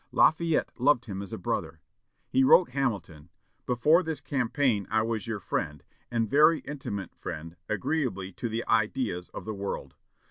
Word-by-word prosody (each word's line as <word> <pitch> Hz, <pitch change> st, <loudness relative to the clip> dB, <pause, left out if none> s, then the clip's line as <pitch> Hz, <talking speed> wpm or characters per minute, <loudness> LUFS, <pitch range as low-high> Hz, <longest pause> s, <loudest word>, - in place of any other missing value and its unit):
Lafayette 165 Hz, +1 st, +3 dB
loved 125 Hz, -2 st, +3 dB
him 100 Hz, -4 st, -5 dB
as 100 Hz, -, -8 dB
a -, -, -4 dB
brother. -, -, -3 dB, 0.5 s
He 135 Hz, -, +3 dB
wrote 170 Hz, +5 st, +6 dB
Hamilton, 100 Hz, -, -3 dB, 0.4 s
"Before 150 Hz, +8 st, +4 dB
this 160 Hz, -4 st, -2 dB
campaign 125 Hz, -5 st, 0 dB
I 110 Hz, +1 st, +2 dB
was 115 Hz, 0 st, -2 dB
your 110 Hz, -2 st, -2 dB
friend 75 Hz, -6 st, -3 dB, 0.3 s
and 115 Hz, -2 st, 0 dB
very 155 Hz, +6 st, +5 dB
intimate 130 Hz, -9 st, -5 dB
friend, 80 Hz, +2 st, -7 dB
agreeably 110 Hz, -, -1 dB
to 120 Hz, +5 st, -4 dB
the 115 Hz, +1 st, -3 dB
ideas 110 Hz, -5 st, 0 dB
of -, -, -8 dB
the 110 Hz, -, -3 dB
world. 100 Hz, 0 st, -5 dB
115 Hz, 155 wpm, -28 LUFS, 100-140 Hz, 0.5 s, wrote